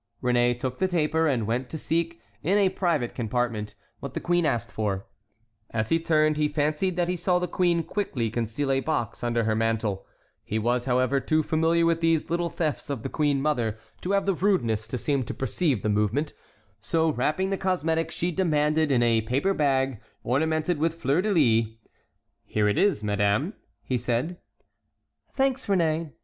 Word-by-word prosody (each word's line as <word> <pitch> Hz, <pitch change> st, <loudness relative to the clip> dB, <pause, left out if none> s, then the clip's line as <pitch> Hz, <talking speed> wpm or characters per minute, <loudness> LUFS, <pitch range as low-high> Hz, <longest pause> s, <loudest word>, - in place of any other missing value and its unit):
Réné 120 Hz, -1 st, +2 dB
took 130 Hz, 0 st, -4 dB
the 190 Hz, -, +2 dB
taper, 160 Hz, -2 st, +1 dB
and 125 Hz, -7 st, +1 dB
went 125 Hz, +4 st, -2 dB
to 160 Hz, -, -5 dB
seek, 165 Hz, -4 st, -1 dB, 0.2 s
in 185 Hz, +7 st, +2 dB
a 200 Hz, -2 st, +4 dB
private 165 Hz, -11 st, -1 dB
compartment, 115 Hz, -2 st, -2 dB, 0.2 s
what -, -, -7 dB
the -, -, -1 dB
queen 175 Hz, -2 st, +1 dB
asked 120 Hz, -6 st, -1 dB
for. 100 Hz, -3 st, -2 dB, 0.6 s
As 110 Hz, -1 st, -2 dB
he 165 Hz, -, +3 dB
turned, 155 Hz, -2 st, +2 dB
he 150 Hz, -1 st, +2 dB
fancied 150 Hz, +5 st, 0 dB
that 175 Hz, -1 st, +1 dB
he 180 Hz, -, 0 dB
saw 180 Hz, +1 st, +1 dB
the 180 Hz, 0 st, -1 dB
queen 175 Hz, -1 st, +1 dB
quickly 125 Hz, -, -2 dB
conceal 120 Hz, +5 st, -1 dB
a 135 Hz, -, +2 dB
box 120 Hz, -7 st, -2 dB
under 120 Hz, -1 st, +1 dB
her 110 Hz, 0 st, +1 dB
mantle; 110 Hz, -3 st, -1 dB, 0.4 s
he 110 Hz, -, -3 dB
was, 120 Hz, +2 st, 0 dB
however, 130 Hz, +1 st, +2 dB
too 155 Hz, +3 st, +1 dB
familiar 165 Hz, +2 st, +2 dB
with 165 Hz, 0 st, +1 dB
these 165 Hz, -1 st, +1 dB
little 170 Hz, 0 st, 0 dB
thefts 155 Hz, -5 st, -3 dB
of 135 Hz, -6 st, -3 dB
the 135 Hz, -, -3 dB
queen 145 Hz, -2 st, +1 dB
mother 120 Hz, -8 st, 0 dB, 0.2 s
to 190 Hz, -, -1 dB
have 200 Hz, -, +2 dB
the 195 Hz, -, +2 dB
rudeness 120 Hz, -, 0 dB
to 125 Hz, -, -3 dB
seem 140 Hz, +2 st, 0 dB
to 125 Hz, -, -5 dB
perceive 135 Hz, -, 0 dB
the -, -, 0 dB
movement; 105 Hz, +8 st, 0 dB, 0.5 s
so 160 Hz, +7 st, +1 dB
wrapping 155 Hz, +9 st, 0 dB
the -, -, +2 dB
cosmetic 165 Hz, -4 st, 0 dB
she 175 Hz, +1 st, -2 dB
demanded 155 Hz, -3 st, +1 dB
in 120 Hz, -3 st, +3 dB
a 115 Hz, -1 st, +3 dB
paper 135 Hz, -, 0 dB
bag, 135 Hz, -, +1 dB, 0.2 s
ornamented 155 Hz, +5 st, 0 dB
with 165 Hz, +1 st, +1 dB
fleurs 150 Hz, +1 st, +1 dB
de 215 Hz, -, -1 dB
lis: 115 Hz, -, +3 dB, 0.7 s
"Here 105 Hz, -1 st, 0 dB
it 105 Hz, -, +1 dB
is, 195 Hz, -, +2 dB
madame," 105 Hz, -, +1 dB, 0.3 s
he 125 Hz, -2 st, -1 dB
said. 125 Hz, +9 st, -2 dB
145 Hz, 180 wpm, -26 LUFS, 120-165 Hz, 0.7 s, a